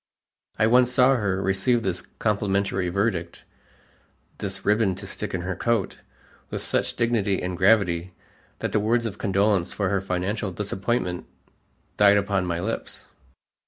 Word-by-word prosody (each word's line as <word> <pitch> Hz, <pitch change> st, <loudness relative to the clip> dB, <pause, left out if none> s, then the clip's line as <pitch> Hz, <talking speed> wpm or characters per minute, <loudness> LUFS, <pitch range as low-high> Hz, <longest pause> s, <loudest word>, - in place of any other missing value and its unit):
I 110 Hz, -, +3 dB
once 125 Hz, +2 st, +4 dB
saw 130 Hz, +2 st, +5 dB
her 100 Hz, -4 st, 0 dB
receive 100 Hz, +5 st, +2 dB
this 90 Hz, -2 st, -1 dB
complimentary 100 Hz, -2 st, -1 dB
verdict 90 Hz, -3 st, -2 dB, 0.9 s
"this 95 Hz, -1 st, -4 dB
ribbon 105 Hz, -2 st, +2 dB
to -, -, -8 dB
stick -, -, -5 dB
in 90 Hz, -, -2 dB
her 95 Hz, +1 st, -3 dB
coat" 115 Hz, 0 st, -1 dB, 0.5 s
with -, -, -4 dB
such -, -, 0 dB
dignity 115 Hz, -5 st, +1 dB
and 90 Hz, 0 st, -3 dB
gravity 90 Hz, -2 st, +2 dB, 0.5 s
that -, -, -2 dB
the -, -, +2 dB
words 115 Hz, +3 st, +1 dB
of 110 Hz, -, -5 dB
condolence 100 Hz, -2 st, +1 dB
for 100 Hz, -3 st, -1 dB
her 100 Hz, -1 st, +1 dB
financial 95 Hz, +2 st, -2 dB
disappointment, 95 Hz, -1 st, -2 dB, 0.7 s
died 100 Hz, 0 st, +6 dB
upon 100 Hz, -2 st, 0 dB
my 85 Hz, -1 st, -1 dB
lips. 110 Hz, +6 st, -4 dB
100 Hz, 145 wpm, -25 LUFS, 95-110 Hz, 0.9 s, died